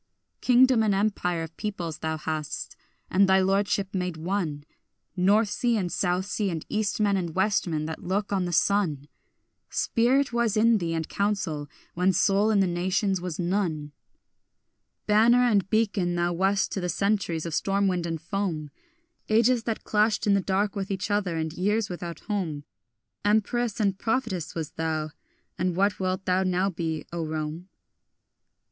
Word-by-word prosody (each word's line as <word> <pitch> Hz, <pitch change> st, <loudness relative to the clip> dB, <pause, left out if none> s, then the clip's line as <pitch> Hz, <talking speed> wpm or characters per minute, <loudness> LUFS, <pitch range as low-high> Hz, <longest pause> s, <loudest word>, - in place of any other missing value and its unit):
Kingdom 255 Hz, -1 st, +5 dB
and 210 Hz, -3 st, +2 dB
empire 185 Hz, -4 st, 0 dB
of 165 Hz, 0 st, -9 dB
peoples 175 Hz, -7 st, -4 dB
thou 160 Hz, 0 st, -2 dB
hadst, 155 Hz, -1 st, -4 dB, 0.4 s
and 195 Hz, +1 st, +4 dB
thy 190 Hz, 0 st, +5 dB
lordship 195 Hz, 0 st, +1 dB
made 180 Hz, -3 st, -2 dB
one 165 Hz, -4 st, -2 dB, 0.5 s
North 200 Hz, +4 st, +3 dB
sea 240 Hz, +1 st, +1 dB
and 180 Hz, -4 st, -2 dB
south 180 Hz, 0 st, 0 dB
sea 205 Hz, 0 st, -1 dB
and 165 Hz, -3 st, -4 dB
east 215 Hz, 0 st, -1 dB
men 205 Hz, -2 st, +3 dB
and 175 Hz, -4 st, -3 dB
west 200 Hz, +1 st, +1 dB
men 155 Hz, -2 st, -2 dB
that 160 Hz, 0 st, -6 dB
look 200 Hz, +2 st, -1 dB
on 190 Hz, -2 st, +1 dB
the 175 Hz, -, -3 dB
sun; 170 Hz, -6 st, +1 dB, 0.6 s
Spirit 250 Hz, +3 st, +1 dB
was 235 Hz, -3 st, +1 dB
in 225 Hz, 0 st, +4 dB
thee 165 Hz, -2 st, -2 dB
and 160 Hz, -1 st, -2 dB
counsel, 180 Hz, -8 st, -2 dB, 0.2 s
when 180 Hz, +2 st, +2 dB
soul 200 Hz, +3 st, +3 dB
in 210 Hz, -2 st, +3 dB
the -, -, +4 dB
nations 185 Hz, +2 st, 0 dB
was 180 Hz, -3 st, -4 dB
none. 170 Hz, -5 st, -1 dB, 1.1 s
Banner 230 Hz, +4 st, +5 dB
and 205 Hz, -6 st, +2 dB
beacon 200 Hz, -5 st, +1 dB
thou 175 Hz, 0 st, 0 dB
wast 195 Hz, +3 st, +1 dB
to 195 Hz, -, -3 dB
the 180 Hz, -, -2 dB
centuries 195 Hz, -5 st, 0 dB
of 165 Hz, -, -4 dB
storm 195 Hz, +4 st, +1 dB
wind 180 Hz, -2 st, -1 dB
and 165 Hz, -1 st, -3 dB
foam, 165 Hz, -4 st, -3 dB, 0.6 s
Ages 230 Hz, +1 st, +3 dB
that 225 Hz, -2 st, -3 dB
clashed 210 Hz, +1 st, +1 dB
in 205 Hz, -, +4 dB
the 200 Hz, -, +3 dB
dark 195 Hz, +2 st, 0 dB
with 195 Hz, -1 st, -3 dB
each 195 Hz, +1 st, -3 dB
other, 195 Hz, -5 st, 0 dB
and 160 Hz, 0 st, -2 dB
years 205 Hz, +4 st, 0 dB
without 170 Hz, -2 st, -6 dB
home; 175 Hz, -9 st, -3 dB, 0.6 s
Empress 220 Hz, +2 st, +1 dB
and 200 Hz, -2 st, +1 dB
prophetess 225 Hz, -, -2 dB
wast 160 Hz, -2 st, -5 dB
thou, 155 Hz, -1 st, -2 dB, 0.5 s
and 180 Hz, -1 st, 0 dB
what 200 Hz, +2 st, +1 dB
wilt 185 Hz, 0 st, -2 dB
thou 185 Hz, +1 st, +2 dB
now 185 Hz, +1 st, +1 dB
be, 160 Hz, -3 st, -3 dB
O 170 Hz, -1 st, -2 dB
Rome? 155 Hz, +3 st, -4 dB
190 Hz, 165 wpm, -26 LUFS, 170-210 Hz, 1.1 s, Kingdom